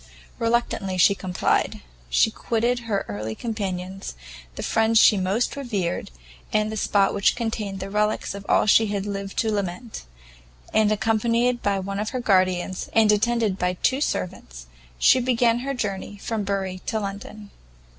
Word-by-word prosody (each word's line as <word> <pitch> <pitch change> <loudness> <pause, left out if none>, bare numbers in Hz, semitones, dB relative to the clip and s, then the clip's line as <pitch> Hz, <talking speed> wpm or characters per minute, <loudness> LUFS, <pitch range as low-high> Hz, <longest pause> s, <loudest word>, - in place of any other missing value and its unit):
Reluctantly 230 -5 0
she 200 +3 +6
complied; 185 -2 -1 0.3
she - - +3
quitted 235 +2 0
her 205 -3 -1
early 105 +2 -4
companions, 195 - -4 0.4
the - - -5
friend 225 0 +2
she 220 - +7
most 195 +5 0
revered, 205 -11 -3 0.4
and 215 0 +1
the - - -4
spot 200 -1 +2
which 200 - +2
contained 215 -4 -3
the 190 - -4
relicks 210 0 0
of 200 0 -8
all - - +4
she 220 +1 +5
had 200 -1 -2
yet 205 - -3
lived 195 0 -6
to 220 - +1
lament; 205 +3 -4 0.7
and, 215 -1 +3
accompanied 230 +3 +1
by 200 -1 +1
one 195 +1 -4
of 210 0 -2
her 255 - -3
guardians, 185 -4 +1
and 220 -1 +5
attended 220 -2 +1
by 180 0 +1
two 265 +2 +2
servants, - - -3 0.3
she 160 - +5
began 240 -1 +2
her 270 +3 -3
journey 205 -3 -4
from 215 +1 -3
Bury 195 -2 -2
to 220 - 0
London. 205 +1 -7
205 Hz, 160 wpm, -24 LUFS, 190-225 Hz, 0.7 s, she